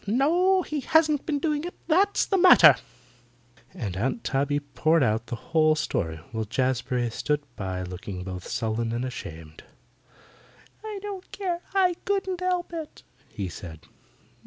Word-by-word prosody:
"No, 345 - +3
he 305 -2 -3
hasn't 305 0 +2
been 300 -3 +1
doing 295 0 -1
it, 350 - -6
that's 385 +5 +3
the 390 - +1
matter," 175 - +9 1.0
and 100 -6 -5
Aunt 130 - -2
Tabby 140 +1 0
poured 155 +2 +1
out 110 +1 0
the 120 - -3
whole 155 +5 +2
story, 85 - -2
while 110 -1 -2
Jazbury 125 +1 -1
stood 150 +5 -1
by 95 -2 -4
looking 90 +1 -6
both 90 -1 -7
sullen 115 0 -2
and 120 +2 -2
ashamed. 80 -10 -8 1.2
"I 430 -1 -5
don't 395 -3 -7
care; 355 -3 -3
I 370 -2 +4
couldn't 385 -2 -1
help 360 -1 -1
it," 320 -2 -7 0.3
he 100 -2 -4
said. 80 -2 -9
150 Hz, 145 wpm, -26 LUFS, -, 1.2 s, matter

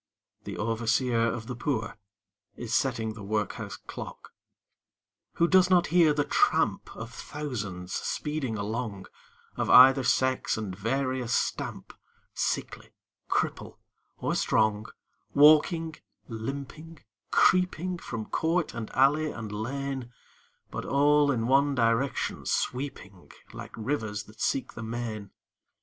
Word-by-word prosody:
the - - -6
Overseer 115 +1 +1
of 115 -1 -3
the 125 - -5
Poor 115 -4 -2 0.6
Is 120 -2 -5
setting 115 -4 0
the 110 - -10
Workhouse 105 0 -3
Clock. - - -9 1.0
Who 170 - +2
does 185 0 +5
not 180 -2 +4
hear 170 -3 +6
the 145 0 +1
tramp - - +1
Of 115 +1 -8
thousands 105 -12 -5
speeding 150 -7 -2
along 105 -1 -4 0.5
Of - - -1
either 130 +1 +8
sex 130 0 +1
and 105 -4 -4
various 125 +3 -1
stamp, - - -3 0.4
Sickly, - - -3 0.4
cripple, - - -2 0.4
or - - -1
strong, 110 0 +1 0.5
Walking, 155 +2 +5 0.3
limping, 140 +7 -7 0.3
creeping 180 -1 +2
From 115 -7 -5
court 165 +6 0
and 115 -2 -5
alley, 145 +4 +3
and 115 -6 -7
lane, 130 +3 -4 0.6
But - - -4
all 145 +1 +3
in 115 -4 -1
one 140 +3 +3
direction 115 +3 0
sweeping 125 -8 -3 0.2
Like - - -9
rivers 110 -3 -3
that 110 +1 -15
seek 130 -2 -1
the 115 - -8
main? 110 -3 -5
125 Hz, 120 wpm, -28 LUFS, 110-145 Hz, 1.0 s, either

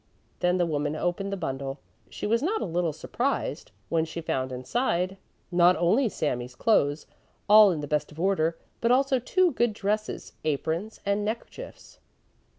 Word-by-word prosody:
Then 180 0 +2
the 175 - +2
woman 150 -2 -1
opened 175 +4 -2
the 200 - -2
bundle. 135 -4 -4 0.3
She - - -6
was 230 +3 +2
not 410 +9 0
a - - -2
little 170 -2 0
surprised, - - -2 0.2
when 165 -1 +1
she 165 +1 -5
found 130 -5 -2
inside 180 - -1 0.4
not 175 +1 +5
only 210 - +2
Sami's 125 -8 -3
clothes, 145 - +2 0.4
all 210 0 +8
in 165 -5 -1
the 145 - -5
best 150 +1 -1
of 150 - -12
order, 170 -3 +1 0.2
but 235 - +1
also 265 +1 +3
two 360 +8 +2
good 240 -4 +1
dresses, 210 +1 -3
aprons 160 +7 -2
and 200 +1 +1
neckerchiefs. 230 - -7
180 Hz, 160 wpm, -27 LUFS, 155-215 Hz, 0.4 s, all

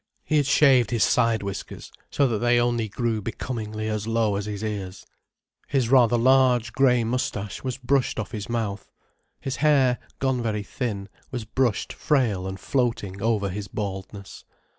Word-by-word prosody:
He 155 - +1
had 145 -2 +2
shaved 135 -6 +5
his 115 -2 +2
side 115 -3 +2
whiskers, 100 0 -6 0.2
so 140 - +2
that 110 -3 -1
they 120 +1 +3
only 120 -2 0
grew 115 +1 -1
becomingly 110 -1 -4
as 110 0 -2
low 115 -2 +1
as 100 +1 -3
his 105 0 -5
ears. 100 -3 -5 0.6
His 130 -5 0
rather 120 -3 +5
large, 125 -2 +3
grey 125 -3 +3
moustache 110 -4 -3
was 130 -1 -3
brushed 135 0 0
off - - -4
his 105 -1 -6
mouth. 110 -4 -3 0.5
His 135 - -3
hair, 135 -5 +3 0.2
gone 130 -2 0
very 105 -3 -2
thin, 100 -4 -4 0.2
was 120 -4 -5
brushed 115 -1 0
frail 115 -11 0
and 95 0 -6
floating 115 -7 -1
over 105 -2 +1
his 100 +2 -5
baldness. 100 0 -6
115 Hz, 160 wpm, -25 LUFS, 105-125 Hz, 0.6 s, shaved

